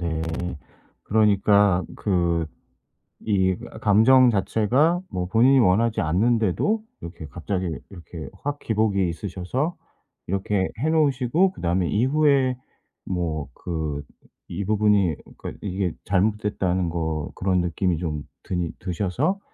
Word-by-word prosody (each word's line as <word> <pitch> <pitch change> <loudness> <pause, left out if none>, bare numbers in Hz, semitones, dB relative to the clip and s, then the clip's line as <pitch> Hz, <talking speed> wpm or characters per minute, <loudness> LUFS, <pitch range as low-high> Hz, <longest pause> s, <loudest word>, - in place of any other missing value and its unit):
네. 80 -2 -2 0.8
그러니까 100 -3 +3
그 85 -4 0 0.8
이 95 -3 +2 0.3
감정 120 +5 +6
자체가 120 - +2
뭐 90 -1 -2
본인이 120 +8 +4
원하지 115 +1 +3
않는데도 115 - +1 0.2
이렇게 85 -2 -8
갑자기 90 +6 -3 0.2
이렇게 85 -3 -9 0.2
확 145 0 -3
기복이 105 -4 +1
있으셔서 100 - -3 0.5
이렇게 95 0 0
해 150 - 0
놓으시고 155 +2 +2
그다음에 90 - -1
이후에 135 +1 +2 0.5
뭐 80 -5 -3
그 80 -4 -4 0.5
이 95 +4 -3
부분이 105 -4 +2 0.2
그러니까 - - -8
이게 95 -3 -2
잘못됐다는 95 -2 0
거 80 -2 -3
그런 95 -1 +1
느낌이 90 0 0
좀 80 -4 -3 0.2
드니 90 -2 -2
드셔서 100 - -1
100 Hz, 260 characters per minute, -24 LUFS, 90-115 Hz, 0.8 s, 감정